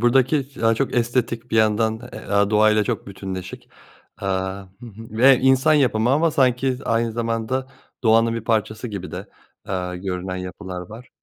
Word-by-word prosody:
buradaki 130 +4 +3
daha 115 0 +3
çok 135 +3 -1
estetik 120 -1 -1
bir - - +1
yandan, 110 +1 +2 0.3
aaa, 100 0 +2
doğa 110 0 +5
ile 105 -1 +2
çok - - -3
bütünleşik, 95 -2 -7 0.5
aaa, 95 0 -2 0.2
hı 120 - -10
hı, 115 0 -12
ve 125 +4 +5
insan 135 +4 +4
yapımı 120 -5 +2
ama 160 +4 +3
sanki 130 -3 +2
aynı 115 0 0
zamanda 115 +3 -2 0.4
doğanın 115 0 +4
bir 115 -1 -5
parçası 110 +1 -1
gibi 95 -5 -6
de, - - -7 0.4
aaa, 90 -1 -3
görünen 90 0 -4
yapılar 90 0 -6
var. 115 +3 -11
115 Hz, 160 wpm, -22 LUFS, 100-125 Hz, 0.5 s, doğa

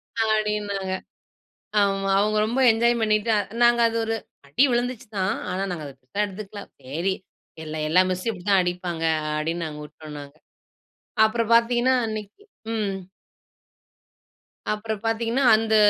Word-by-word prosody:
அப்டின்னாங்க. 210 -3 0 0.9
ஆமா. 195 -1 +1
அவங்க 215 +1 +1
ரொம்ப 245 +4 0
என்ஜாய் 235 +1 +2
பண்ணீட்டு. 215 +1 +2 0.3
நாங்க 240 0 +5
அது 230 - -3
ஒரு 225 0 -1 0.3
அடி 250 - +4
விழுந்துச்சு 245 0 -1
தான். 190 +4 +1 0.2
ஆனா 185 +2 -2
நாங்க 160 -4 -4
அத 140 - -8
பெருசா 130 +12 -3
எடுத்துக்கல. 200 +1 -8 0.2
சரி 165 +9 -1 0.5
எல்லா, 155 0 -5
எல்லா 180 +4 +5
மிஸ்சும் 185 +5 -2
இப்படி 175 -2 -11
தான் 195 -1 +6
அடிப்பாங்க 175 -2 -3 0.3
அடின்னு 165 +2 -2
நாங்க 150 -1 -7
உட்டோனாங்க. 150 -1 -10 0.9
அப்புற 230 +2 +1
பாத்தீங்கன்னா 240 +2 +4
அன்னைக்கி 215 - -6 0.3
ம். 205 -3 -1 1.8
அப்புறம் 215 0 -4
பாத்தீங்கன்னா 230 +4 +1
அந்த 220 0 +1
210 Hz, 130 wpm, -24 LUFS, 180-225 Hz, 1.8 s, தான்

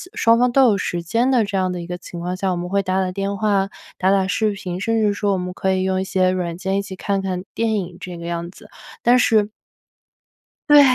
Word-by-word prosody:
双 230 0 +4
方 250 +1 +3
都 270 +2 +5
有 215 -5 +4
时 175 -2 -2
间 230 +9 +1
的 245 -4 +4
这 200 -1 -2
样 185 -1 +1
的 180 - -4
一 170 - -8
个 180 0 -4
情 175 -1 -9
况 180 +2 -3
下， 190 0 0
我 - - 0
们 175 +1 -4
会 200 +1 +1
打 185 0 0
打 185 -1 -1
电 195 +1 -2
话、 195 -1 +1 0.3
打 190 +1 +2
打 195 -1 +2
视 215 +2 +1
频， 185 -3 -5
甚 225 +2 +1
至 210 -1 +2
说 205 0 0
我 - - 0
们 180 0 -4
可 190 +1 0
以 185 - 0
用 190 0 0
一 - - -1
些 185 -1 +1
软 180 -2 -2
件 190 +1 -1
一 - - +1
起 195 -1 -8
看 200 +1 -1
看 185 -1 -3
电 225 -1 +1
影 180 -3 -4
这 180 -2 -7
个 170 - -8
样 170 0 -3
子， - - -16 0.3
但 240 +1 +5
是 215 -4 +3 1.2
对， 295 0 +9
190 Hz, 280 characters per minute, -21 LUFS, 180-205 Hz, 1.2 s, 对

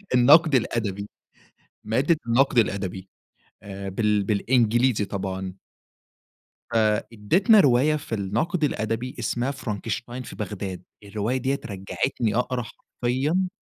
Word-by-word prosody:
النقد 150 +5 +6
الأدبي، 105 -4 -1 0.8
مادة 135 +10 +2
النقد 125 +2 +3
الأدبي 95 -3 -1 0.5
آآ 100 -1 -7
بال 105 +1 +1
بالإنجليزي 115 +2 +2
طبعًا. 95 -2 -4 1.2
فإدّتنا 115 - +3
رواية 140 0 +4
في 140 -6 -4
النقد 115 - -1
الأدبي 115 -2 -2
اسمها 125 +3 -1
فرانكشتاين 120 0 -5
في - - -10
بغداد، 100 -3 -5 0.2
الرواية 105 +5 -2
دي 130 +1 0
رجّعتني 105 +2 -3
أقرا 125 0 0
حرفيًا 135 +11 -2
115 Hz, 100 wpm, -24 LUFS, 100-130 Hz, 1.2 s, النقد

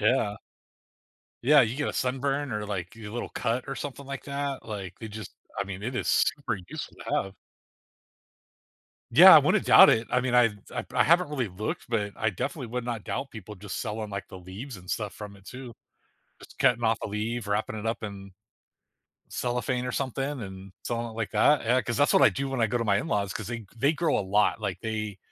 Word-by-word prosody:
yeah. 110 -2 +2 1.1
Yeah, 145 +3 +7
you 120 0 +1
get 145 - -1
a - - -2
sunburn 135 +2 -1
or 105 0 -2
like 95 0 -5
a 110 -2 -8
little 120 +3 -4
cut 120 +1 -2
or 135 - -2
something 140 -1 -6
like 140 -1 -6
that, 140 -2 -3
like, 100 -4 -6
they 110 - -7
just 110 0 -8 0.3
I 100 - 0
mean, 100 0 -7
it 125 +4 -3
is - - -2
super 140 -7 +1
useful - - -7
to - - -2
have. 95 0 -11 1.8
Yeah, - - +10
I - - +11
wouldn't - - +2
doubt - - +9
it. 115 +1 +1
I - - +3
mean, 125 -1 -1
I've 115 -3 +5 0.2
I've - - -3
I - - +4
haven't 170 +1 +4
really 130 -7 -1
looked, 100 +4 -5
but 105 -4 -1
I 110 - +1
definitely 135 - -4
would 125 0 -3
not 115 -4 -4
doubt 105 +7 -3
people 105 -1 -9
just 100 +1 -6
selling 110 -2 -4
like 100 -1 -5
the 95 - -9
leaves 100 +8 -8
and 90 0 -10
stuff 105 -3 -3
from 105 -1 -9
it 95 - -19
too. 125 -1 -8 0.7
Just - - -15
cutting 120 -1 +3
off 115 0 +3
a - - -2
leaf, 110 +2 -3
wrapping 105 +1 -1
it 105 - -6
up 115 0 -2
in 100 -2 -7 1.0
cellophane 125 +1 -2
or 125 - -3
something 135 +1 -2
and 95 -1 -9
something 115 -1 -3
like 115 -1 -3
that, 150 0 +4
yeah, 125 +3 +3
cause 120 - -3
that's 145 0 +4
what - - +5
I - - +9
do 135 0 -3
when 135 -2 -2
I 115 - +4
go 120 +3 -1
to 115 - -1
my 100 -2 +3
in-laws, 100 -2 -1
'cause 105 - -5
they 120 0 -5
they 140 +6 +3
grow 160 0 +1
a - - +1
lot, 105 +3 +2
like, 100 -4 -3
they, 110 -3 -4
115 Hz, 220 wpm, -27 LUFS, 105-130 Hz, 1.8 s, I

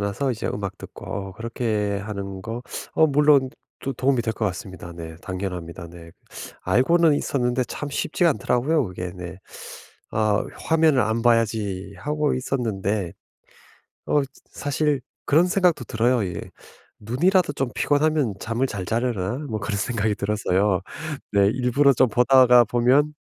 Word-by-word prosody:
나서 100 +7 -1
이제 115 -2 -3
음악 100 -2 -4
듣고 - - -11
어 95 0 -5
그렇게 110 -2 -2
하는 100 -2 -6
거. 115 +3 -5 0.3
어 160 - +5
물론 145 -2 +4 0.3
도 135 - -3
도움이 130 -1 +1
될 110 -1 -2
것 110 - -2
같습니다. 95 -2 -6
네. 80 -1 -8
당연합니다. 90 -3 -5
네 85 -1 -13 0.5
알고는 150 - +4
있었는데 125 -3 0
참 145 - -6
쉽지가 170 +4 +1
않더라고요 130 +6 +1
그게 90 -1 -6
네. 90 0 -8 0.7
아 110 -1 +1 0.2
'화면을 160 -4 +4
안 110 +2 -1
봐야지.' 105 -5 +1
하고 150 +6 0
있었는데 110 -8 -2 1.0
어 150 - +3
저 135 - -9 0.2
사실 145 -1 -1 0.2
그런 165 +5 +4
생각도 180 - +2
들어요 115 0 +1
예. 90 - -5 0.6
'눈이라도 145 - +2
좀 135 -3 -2
피곤하면 145 -6 +1
잠을 115 +4 -1
잘 100 -6 -5
자려나.' 115 0 -1
뭐 110 - -2
그런 100 0 -3
생각이 110 -1 0
들어서요. 100 -2 +1 0.5
네 100 -1 +5
일부러 130 +3 +3
좀 130 +1 +4
보다가 125 +1 +6
보면 125 +6 +3
115 Hz, 300 characters per minute, -23 LUFS, 100-135 Hz, 1.0 s, 보다가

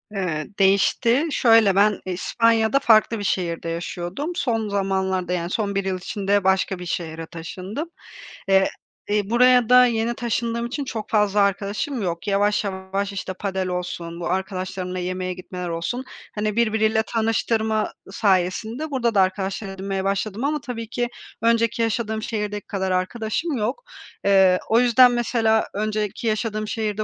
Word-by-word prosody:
Eee, 165 -6 -2
değişti; 230 +8 +3
şöyle 225 -7 +5
ben 205 0 +4
İspanya'da 225 +6 +2
farklı 225 -3 +4
bir - - -4
şehirde 170 -4 -1
yaşıyordum. 175 - -4
Son 225 - -1
zamanlarda, 190 -2 -1
yani 170 -1 -2
son 200 0 -2
bir 195 -1 0
yıl 190 -1 -1
içinde, 200 +2 0
başka 190 0 +1
bir 180 - -7
şehre 165 -2 -4
taşındım. 185 - -6 0.6
Eee, 190 0 +4 0.6
buraya 245 +2 +4
da 250 0 +8
yeni 230 -1 0
taşındığım 235 0 -2
için 275 +4 -4
çok 225 -4 -5
fazla 210 -1 +2
arkadaşım 200 +7 -1
yok. 170 0 -3
Yavaş 205 +1 +2
yavaş, 195 0 -3
işte 195 -1 -4
padel 190 -1 -3
olsun, 175 -2 -4
bu 170 - -3
arkadaşlarımla 185 -1 -3
yemeğe 185 0 -3
gitmeler 180 0 -6
olsun, 170 +10 -3 0.3
hani, 210 0 -1
birbiriyle 220 -1 +2
tanıştırma 220 -1 0 0.2
sayesinde 210 - 0
burada 240 -4 0
da 195 - +6
arkadaşlar 190 +2 -1
edinmeye 195 0 -3
başladım 200 +3 -2
ama 295 +1 0
tabii 230 -3 -6
ki 240 0 -2 0.3
önceki 230 0 +2
yaşadığım 220 -1 -1
şehirdeki 210 -2 -3
kadar 190 -2 -2
arkadaşım 220 - -1
yok. 235 - -2 0.4
Eee, 190 -2 +5
o 225 - +5
yüzden 245 +1 +6
mesela, 230 -2 +1
önceki 215 +2 -2
yaşadığım 215 -1 -1
şehirde 215 -1 -2
205 Hz, 145 wpm, -23 LUFS, 190-230 Hz, 0.6 s, da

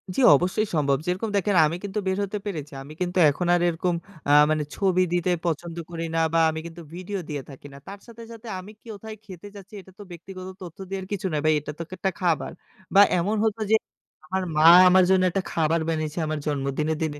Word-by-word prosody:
জি - - -1 0.2
অবশ্যই 185 +8 0
সম্ভব। 140 -3 +2
যেরকম 185 +5 -2
দেখেন 200 0 0
আমি 155 +2 -1
কিন্তু 205 +1 -3
বের 190 0 0
হতে 200 +1 -4
পেরেছি। 155 -8 -5
আমি 145 +3 -11
কিন্তু 180 0 -2
এখন 170 +5 -2
আর 175 - 0
এরকম 170 +1 -1 0.3
আ - - +4 0.2
মানে 155 -1 0
ছবি 185 -2 +2
দিতে 175 0 0 0.2
পছন্দ 170 0 -3
করি 165 -1 -5
না - - +2
বা 165 - +3
আমি 160 0 -4
কিন্তু 170 0 -9
ভিডিও 185 +3 -5
দিয়ে 145 -2 -4
থাকি 140 +1 -12
না। - - -11
তার 200 +1 -9
সাথে, 235 0 -12
সাথে 230 0 -11
আমি 190 +3 -11
কোথায় 220 -1 -9
খেতে 190 -1 -11
যাচ্ছি 200 +1 -13
এটা 190 - -18
তো - - -8
ব্যক্তিগত 185 +2 -9 0.2
তথ্য 170 -2 -10
দেয়ার 190 -1 -4
কিছু 200 -1 -2
না - - 0
ভাই, 155 - +4
এটা 150 - -7
তো-একটা 185 +3 -3
খাবার 175 -4 0 0.4
বা 200 - +9 0.2
এমন 200 +6 0
হতো 220 0 -1
যে - - +7 0.5
আমার 190 +4 -2
মা 155 +1 +6 0.2
আমার 185 +1 +6
জন্য 190 -1 +4
একটা 195 +2 -1
খাবার 165 0 +1
বানিয়েছে 155 0 -2
আমার 155 0 -2
জন্মদিনে, 145 +2 -1
দিনে। 150 -2 -3
180 Hz, 215 wpm, -24 LUFS, 155-195 Hz, 0.5 s, বা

